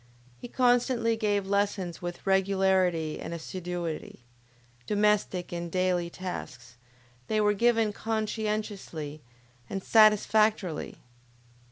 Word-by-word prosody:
He - - -7
constantly 245 -2 +2
gave 205 -3 0
lessons 200 -3 -1
with 175 0 -6
regularity 190 -4 +2
and 165 +1 -5
assiduity; 170 -4 -5 0.7
domestic 210 -3 +1
and 170 -1 -4
daily 180 -1 0
tasks, 125 -10 -7 0.5
they 215 - +1
were 210 0 +3
given 225 0 +2
conscientiously 210 -8 -3 0.5
and 195 -1 -4
satisfactorily. 215 -4 +3
195 Hz, 90 wpm, -28 LUFS, 175-215 Hz, 0.7 s, were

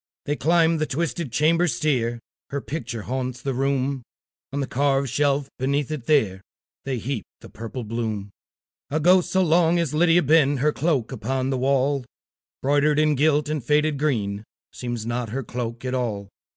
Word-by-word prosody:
They 145 - 0
climb 165 +1 +3
the 155 - 0
twisted 165 -1 -2
chamber 165 +7 +3
stair; 120 -3 0 0.3
Her 140 - -2
picture 125 -6 -5
haunts 130 +1 -3
the 135 +1 -2
room; 135 0 0 0.5
On 140 - -2
the 140 - 0
carved 135 0 +1
shelf 140 -1 +1
beneath 140 +2 0
it 145 -6 -5
there, 110 -12 +2 0.4
They 135 -2 -1
heap 120 +1 -3 0.2
the - - -12
purple 115 +2 -6
bloom. 110 -3 -3 0.6
A 155 - 0
ghost 180 +3 +4
so 190 0 +3
long 170 0 +3
has 165 -4 0
Lydia 170 +2 +4
been, 145 -1 +4
Her 150 +3 +2
cloak 145 -6 0
upon 130 +2 -2
the 130 - 0
wall, 135 +1 +1 0.6
Broidered, 145 +2 +3
and 155 -1 +3
gilt, 150 +1 +2
and 150 -3 -2
faded 150 +2 +2
green, 105 -9 -1 0.3
Seems 120 -3 -4
not 120 0 -2
her 135 +5 -3
cloak 120 +1 -5
at 130 - -2
all. 110 -6 -2
135 Hz, 170 wpm, -24 LUFS, 125-150 Hz, 0.6 s, ghost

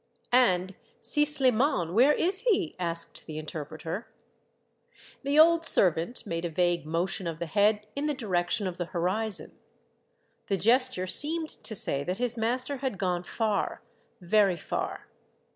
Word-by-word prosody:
" - - -36 0.2
And 185 +1 -2 0.3
Si 295 - +2
Shman, 260 - +2
where 255 +8 +5
is 375 +5 0
he? 405 -8 0
" - - -35
asked 170 -1 -3
the 155 -1 -7
inter 155 0 -6
preter. 165 +8 -7 1.2
The 280 +1 -1
old 330 +1 +5
servant 185 - +1
made 170 -4 -4
a 170 - -2
vague 175 -1 -1
motion 170 +3 -2
of 165 -2 -4
the 170 - -4
head 210 +4 +1
in 285 +2 -2
the 300 - -1
direction 195 -4 -1
of 185 -1 -5
the 175 - -2
horizon. 185 +5 -2 0.9
The 195 - 0
gesture 235 0 +2
seemed 315 - +1
to 220 - -4
say 140 -7 +5
that 180 +4 -3
his 245 -1 +5
master 250 +4 0
had 260 -6 -4
gone 180 -2 -1
far, 215 +2 -3 0.4
very 190 0 +2
far. - - -5
200 Hz, 160 wpm, -27 LUFS, 175-260 Hz, 1.2 s, where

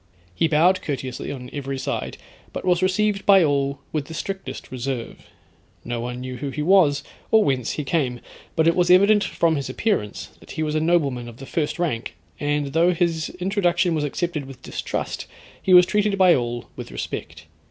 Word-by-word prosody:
He 165 - +2
bowed 170 +4 +3
courteously 130 -4 -4
on 125 -2 -8
every 135 -1 -4
side, 130 - -3 0.4
but - - -5
was 180 -1 +3
received 195 +2 +1
by 195 -3 +6
all 140 -2 +1
with 150 -3 -2
the 160 - -8
strictest 190 -8 -6
reserve. 130 -1 -5 0.6
No 120 0 -3
one 125 +1 -5
knew 130 0 -5
who 140 +3 -4
he 150 +2 -3
was 160 -5 +4 0.3
or 220 -1 +5
whence 130 - 0
he 150 - -3
came, 135 -5 0 0.4
but 160 0 +3
it 165 - +4
was 180 -1 +2
evident 200 +3 +6
from 165 -4 +1
his 140 - -4
appearance, 195 - -1
that - - -12
he 155 - 0
was 150 -1 -1
a 155 - +2
nobleman 145 -7 +1
of 115 - -13
the 135 - -9
first 150 +3 -2
rank, 150 - -2 0.2
and 145 -1 -1
though 170 +2 +3
his 165 -2 0
introduction 180 -2 +1
was 155 -2 0
accepted 150 0 -2
with 135 -2 -12
distrust, - - -4 0.3
he 190 - 0
was 180 -1 +9
treated 210 0 +1
by 185 -2 +6
all 120 -2 -2
with - - -7
respect. 80 0 -6
155 Hz, 190 wpm, -23 LUFS, 135-180 Hz, 0.6 s, was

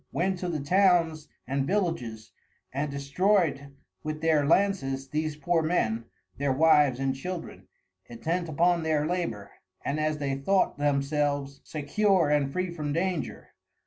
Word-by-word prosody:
went 185 +1 0
to 180 - -3
the 160 -3 -2
Towns 165 -1 +2 0.2
and 135 +2 -1
Villages, 135 - -2 0.4
and 145 +2 -1
destroy'd 140 0 0 0.3
with 155 0 -4
their 155 -3 +2
Lances 145 -8 +1
these 155 +1 -2
poor 165 +3 +1
Men, 115 -9 0 0.3
their 140 -1 +1
Wives 145 -2 +4
and 135 0 0
Children, 175 +5 -7 0.4
intent 165 +8 -3
upon 170 +3 +2
their 155 -2 +1
Labour, 135 - -3 0.3
and 145 +2 -1
as 155 0 0
they 140 -2 -2
thought 145 +4 +1
themselves, 145 -1 0
secure 170 +2 +1
and 145 -2 +2
free 185 +2 -2
from 150 -3 -3
danger. 170 -1 -2
150 Hz, 140 wpm, -27 LUFS, 140-175 Hz, 0.4 s, Wives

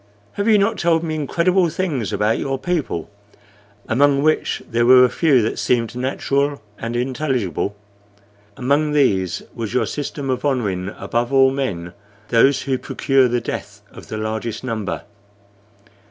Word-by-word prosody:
Have 200 +2 -2
you 220 -2 +6
not 205 +1 +1
told 165 -1 +2
me 160 -1 -2
incredible 170 +4 +1
things 155 - -2
about 105 +2 +1
your 135 -1 -2
people, 160 - -2 0.8
among 140 +3 +3
which 155 0 +1
there 120 +1 +1
were 125 +1 +7
a - - +1
few 140 -7 +3
that 110 - -2
seemed 120 -1 0
natural 140 +2 -1 0.2
and 115 +1 -4
intelligible? 125 - -1 0.8
Among 145 +4 +1
these 95 - +1
was 115 0 -5
your 125 - +2
system 145 -2 -4
of 125 -1 -2
honoring 105 -10 -1
above 120 +1 -2
all 135 -1 +5
men 95 -11 -3 0.4
those 130 +4 +4
who 130 -2 -1
procure 135 -2 +2
the 120 0 0
death - - -6
of - - -12
the 110 - -5
largest 110 +1 -4
number. 110 -5 -3
130 Hz, 150 wpm, -20 LUFS, 115-145 Hz, 0.8 s, were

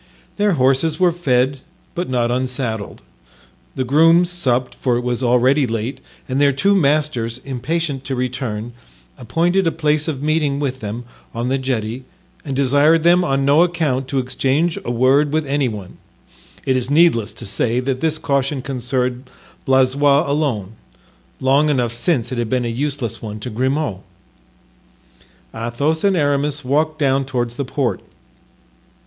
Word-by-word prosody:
Their 205 -1 +2
horses 135 +3 +2
were 180 -1 +4
fed, 135 -5 +1 0.3
but 175 -3 -3
not 120 -2 0
unsaddled; 125 - -3 0.7
the 130 - -1
grooms 165 +6 +4
supped, 130 -8 0
for 125 -3 0
it - - -1
was 125 0 -2
already 130 +3 +3
late, 115 +4 -3 0.3
and 130 +2 -1
their 140 -1 +5
two 190 +10 +2
masters, 145 - +1
impatient 140 +2 -3
to 135 - -2
return, 125 -3 -3 0.4
appointed 170 - 0
a - - +2
place 155 -1 0
of 145 -4 -3
meeting 150 -2 +1
with 130 -2 -2
them 115 +2 -6 0.3
on 120 +2 -2
the 135 +1 0
jetty 125 -1 -3 0.4
and 140 -4 -4
desired 145 +4 +3
them 175 +1 +5
on 135 -4 0
no 145 +4 +5
account 155 -7 0
to 135 - -3
exchange 135 +6 0
a - - -5
word 130 +5 +3
with 155 0 0
any 140 -1 0
one. 105 -5 -7 0.7
It 130 - +2
is 125 0 0
needless 145 -8 +3
to - - -7
say 115 +4 0
that 130 0 -2
this 155 -1 +1
caution 140 -3 -1
concerned 125 -1 -3 0.4
Blaisois 140 +2 +4
alone—long 135 +2 -2
enough 125 -5 0
since 120 -2 0
it 125 - -3
had 115 -2 -2
been 125 0 0
a - - -1
useless 125 -2 -3
one 105 -1 -6
to 125 - -5
Grimaud. 130 -2 -1 1.5
Athos 140 +8 -1
and 195 -2 +3
Aramis 145 -1 0
walked 155 +4 +1
down 135 -2 +2
toward 125 -3 -2
the 135 +3 -4
port. 130 -1 -2
135 Hz, 155 wpm, -19 LUFS, 125-150 Hz, 1.5 s, their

